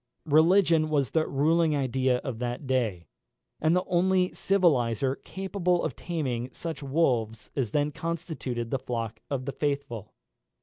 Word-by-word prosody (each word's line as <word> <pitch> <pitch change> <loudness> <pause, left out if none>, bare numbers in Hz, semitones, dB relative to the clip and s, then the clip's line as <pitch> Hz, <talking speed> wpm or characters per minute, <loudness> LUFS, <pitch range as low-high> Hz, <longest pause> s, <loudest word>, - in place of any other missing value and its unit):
Religion 165 +1 +4
was 140 -4 +1
the 160 -1 +1
ruling 155 +3 +2
idea 130 -2 +1
of 130 -6 -4
that 125 +3 -3
day, 115 -10 0 0.5
and 160 +2 +3
the 180 - +2
only 185 +1 +2
civiliser 135 - +1
capable 185 -2 -1
of - - -2
taming 130 -8 -3
such 160 0 -6
wolves 125 -7 0
as 130 -6 0
then 145 +5 +1
constituted 155 -8 -4
the 135 - 0
flock 115 -3 -4
of 130 -2 -2
the 140 - -2
faithful. 140 -8 -3
140 Hz, 140 wpm, -27 LUFS, 125-165 Hz, 0.5 s, Religion